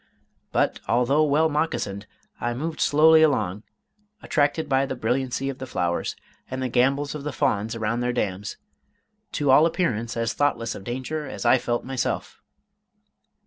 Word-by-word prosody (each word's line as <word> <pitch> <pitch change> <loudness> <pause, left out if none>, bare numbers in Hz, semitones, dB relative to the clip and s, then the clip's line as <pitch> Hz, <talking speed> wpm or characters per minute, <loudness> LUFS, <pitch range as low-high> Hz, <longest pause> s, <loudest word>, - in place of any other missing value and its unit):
But - - +1
although 125 +6 +3
well 155 +2 +3
moccasined, 125 -10 -2 0.3
I 120 0 -2
moved 155 +5 -4
slowly 160 +2 +6
along, 105 - +2 0.6
attracted 150 +1 +1
by 135 0 +2
the 130 - -3
brilliancy 125 +3 -1
of 135 -2 -4
the 130 - -6
flowers, 90 -8 -1 0.3
and 130 - -4
the 130 -1 -1
gambols 135 +4 +1
of 150 -2 -6
the 150 - -3
fawns 110 -3 0
around 115 +1 -1
their 125 0 0
dams, 105 -4 -3 0.8
to 145 -2 +2
all 150 +5 +7
appearance 120 - -1
as 115 0 0
thoughtless 115 -6 0
of - - -9
danger 130 +6 -4
as - - -6
I 130 - +5
felt 120 0 -2
myself. 130 -2 -3
130 Hz, 155 wpm, -24 LUFS, 115-145 Hz, 0.8 s, all